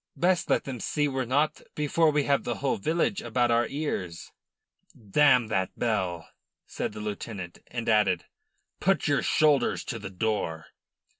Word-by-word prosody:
"Best 180 0 +2
let - - +2
them 130 -3 -6
see 150 +6 0
we're 135 -2 -2
not 145 +5 +1
before 155 +2 +2
we 150 -1 +2
have 140 0 +1
the 120 - -2
whole 135 -1 -1
village 165 - 0
about 120 +1 +1
our 115 0 +3
ears." 95 - -4 0.7
"Damn 125 +4 +4
that 95 -3 -1
bell," 95 -8 -1 0.4
said - - -4
the 105 - -8
lieutenant, 100 -3 -6
and 120 -1 -5
added: 105 -5 +3 0.5
"Put - - +1
your - - +2
shoulders 145 -5 +2
to 115 - -5
the 100 -2 -6
door." 90 -5 -2
120 Hz, 155 wpm, -27 LUFS, 100-145 Hz, 0.7 s, Damn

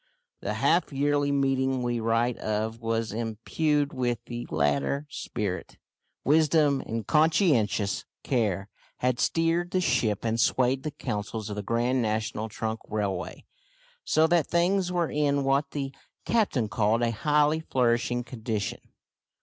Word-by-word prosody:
The - - -2
half 175 -1 +2
yearly 145 +1 +1
meeting 135 -2 +1
we 120 -1 -1
write 115 +2 +1
of 110 +2 -2
was 115 -1 -1
imbued 140 +7 -1
with 125 -2 0
the 120 0 -6
latter 75 - 0
spirit. 105 -4 -4 0.5
Wisdom 150 -1 +4
and 115 -1 -3
conscientious 150 - +2 0.2
care 105 -7 0 0.3
had 125 -1 0
steered 165 +1 +1
the 185 - +1
ship 120 - +1
and 115 0 0
swayed 130 +3 +2
the 155 - -3
councils 105 -4 -4
of - - -4
the 105 - -3
Grand 120 +4 +1
National 110 0 -2
Trunk 110 +1 -3
Railway, 100 -4 -3 0.6
so 155 - +3
that 165 -2 +2
things 180 +2 +1
were 175 -2 0
in 145 -1 +1
what 135 +2 +1
the 135 -2 -4 0.3
captain 200 - +1
called 110 +2 +1
a 115 - +2
highly 150 +6 +2
flourishing 120 -4 +1
condition. 110 -4 -4
125 Hz, 135 wpm, -27 LUFS, 110-145 Hz, 0.6 s, Wisdom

